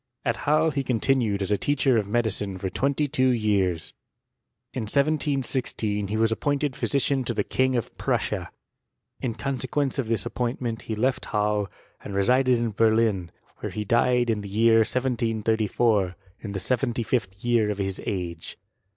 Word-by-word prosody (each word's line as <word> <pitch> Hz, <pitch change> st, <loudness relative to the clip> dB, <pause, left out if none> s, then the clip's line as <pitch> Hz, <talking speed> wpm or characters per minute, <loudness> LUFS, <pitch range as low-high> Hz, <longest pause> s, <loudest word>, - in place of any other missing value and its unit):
At 115 Hz, -2 st, +1 dB
Halle 155 Hz, +1 st, +4 dB
he 140 Hz, -1 st, -1 dB
continued 115 Hz, -4 st, +1 dB
as 95 Hz, -, -3 dB
a 105 Hz, -, +2 dB
teacher 135 Hz, -3 st, +2 dB
of 100 Hz, -, -3 dB
medicine 105 Hz, -3 st, -1 dB
for 95 Hz, 0 st, -4 dB
twenty 140 Hz, +6 st, 0 dB
two 130 Hz, -1 st, +2 dB
years. 100 Hz, -8 st, +1 dB, 0.8 s
In 120 Hz, -, -3 dB
1716 135 Hz, -8 st, 0 dB
he 105 Hz, +2 st, -2 dB
was 110 Hz, 0 st, +2 dB
appointed 145 Hz, +3 st, 0 dB
phy -, -, -2 dB
aician 140 Hz, -1 st, +1 dB
to 120 Hz, -1 st, -2 dB
the 105 Hz, -, +1 dB
King 130 Hz, +3 st, +1 dB
of 120 Hz, -, -3 dB
Prussia. -, -, -1 dB, 0.7 s
In 115 Hz, -3 st, -3 dB
consequence 135 Hz, +2 st, -1 dB
of 125 Hz, -, -1 dB
this 110 Hz, -4 st, 0 dB
appointment 120 Hz, -2 st, -2 dB
he 110 Hz, -, 0 dB
left 130 Hz, +4 st, 0 dB
Halle, 105 Hz, -1 st, 0 dB, 0.3 s
and 100 Hz, -, -6 dB
resided 125 Hz, +5 st, +3 dB
in 115 Hz, -1 st, -1 dB
Berlin, 110 Hz, -4 st, +2 dB, 0.3 s
where -, -, -4 dB
he 105 Hz, -1 st, -4 dB
died 120 Hz, +2 st, +3 dB
in 105 Hz, -2 st, -1 dB
the 100 Hz, -, -7 dB
year 115 Hz, +3 st, +4 dB
1734, 110 Hz, -4 st, +1 dB, 0.2 s
in 100 Hz, -3 st, -6 dB
the 95 Hz, -, -2 dB
seventy 120 Hz, +3 st, 0 dB
fifth 105 Hz, -4 st, -2 dB
year 115 Hz, -3 st, +3 dB
of 105 Hz, -, -2 dB
his 95 Hz, -1 st, -3 dB
age. 85 Hz, -4 st, -4 dB
115 Hz, 165 wpm, -25 LUFS, 105-130 Hz, 0.8 s, Halle